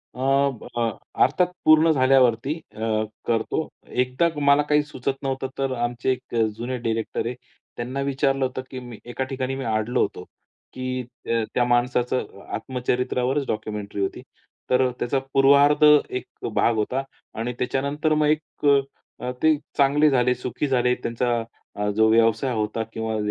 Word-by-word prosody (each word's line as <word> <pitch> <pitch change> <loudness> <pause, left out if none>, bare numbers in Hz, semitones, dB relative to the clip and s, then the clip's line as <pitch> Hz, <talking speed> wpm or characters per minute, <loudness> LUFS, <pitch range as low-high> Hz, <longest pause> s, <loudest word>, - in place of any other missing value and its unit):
अ, - - -11
ब 135 -2 +1
अ, 115 -1 +2 0.3
अर्थात 180 +7 +2
पूर्ण 155 +1 +6
झाल्यावरती, 130 0 +3 0.2
अ, - - -11 0.5
करतो. 120 +7 0 0.4
एकदा 130 +7 +1
मला 140 +1 +5
काही 150 0 +4
सुचत 140 -2 -3
नव्हतं 135 -1 -2
तर 135 -1 -1
आमचे 120 +2 0
एक 125 -1 -5 0.2
जुने 125 +2 -4
डायरेक्टर 115 -1 -2
आहे. 120 +1 -3 0.4
त्यांना 130 +3 -3
विचारलं 135 -1 +1
होतं 130 0 -4
की 130 - -5
मी 120 -3 -10
एका 130 - -2
ठिकाणी 135 -1 -2
मी 135 - -4
अडलो 110 +2 0
होतो. - - -2 0.5
की 130 0 -3 0.3
अ, 115 -1 +2
त्या 125 - +2
माणसाचं 120 -3 0
आत्मचरित्रावरच 125 +2 -1
डॉक्युमेंटरी 105 -2 -4
होती. 95 - -2 0.5
तर 130 0 +3
त्याचा 135 +2 0
पूर्वार्ध 140 +2 +5 0.3
एक 125 - -4 0.3
भाग 115 - +2
होता 125 +5 -1 0.4
आणि 120 +2 -2
त्याच्यानंतर 140 +5 0
मग 150 0 +2
एक 155 0 -2
अ, 135 -3 0
ते 155 0 +6 0.2
चांगले 145 +2 +4
झाले, 125 -2 +2
सुखी 125 +4 -3
झाले, 125 -2 +2
त्यांचा 120 +1 -2 0.4
अ, 105 0 -1
जो 110 0 +4
व्यवसाय 115 +3 +3
होता 110 0 -1
किंवा 110 0 -2
130 Hz, 150 wpm, -24 LUFS, 120-140 Hz, 0.5 s, पूर्ण